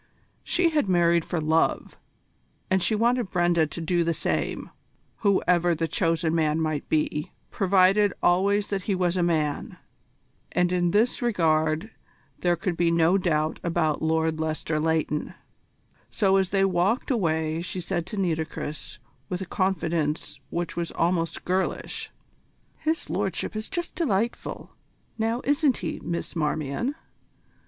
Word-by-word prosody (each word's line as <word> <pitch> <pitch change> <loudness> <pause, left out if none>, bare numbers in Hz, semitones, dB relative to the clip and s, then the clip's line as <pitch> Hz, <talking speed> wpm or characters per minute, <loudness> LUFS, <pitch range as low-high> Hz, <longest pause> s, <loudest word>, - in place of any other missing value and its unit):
She 350 -2 +2
had 295 -10 +1
married 170 -2 +3
for 170 - -2
love, 160 +1 +1 0.8
and 190 0 +3
she 215 - +1
wanted 235 -1 +1
Brenda 175 -3 +2
to 155 - -6
do 170 +1 +1
the 170 0 0
same, 170 - -2 0.5
whoever 180 -4 +2
the 165 +1 -1
chosen 165 0 0
man 155 -1 +1
might 155 -2 -2
be, 150 0 0 0.2
provided 195 +1 +4
always 200 +3 +3
that 200 -1 -1
he 195 - +2
was 180 -1 +1
a 180 - +1
man 155 -4 -1 0.8
and 180 0 +2
in 175 -1 +2
this 220 +9 +2
regard 160 -4 +1 0.5
there 175 -1 +2
could 175 0 -2
be 170 0 +2
no 170 +3 +3
doubt 155 -3 0
about 165 -3 0
Lord 160 0 +1
Lester 155 0 -1
Leighton; 155 -1 -1 0.7
so 195 -3 +2
as 190 -2 +1
they 195 0 +3
walked 195 +8 +1
away 160 -7 0
she 185 +1 -4
said 175 -1 -3
to 210 - -6
Nitocris 160 -4 -3 0.3
with 180 +1 -3
a - - -3
confidence 170 -5 -1
which 170 -1 -3
was 170 -1 -2
almost 165 -1 0
girlish: 185 +1 -2 0.7
"His 320 +1 -1
Lordship - - -2
is 215 +1 -4
just 345 -3 -3
delightful 235 - -2 0.5
now, 225 +2 0
isn't 285 -3 +2
he, - - -4
Miss 170 +1 -4
Marmion? 155 - -1
175 Hz, 140 wpm, -26 LUFS, 160-195 Hz, 0.8 s, provided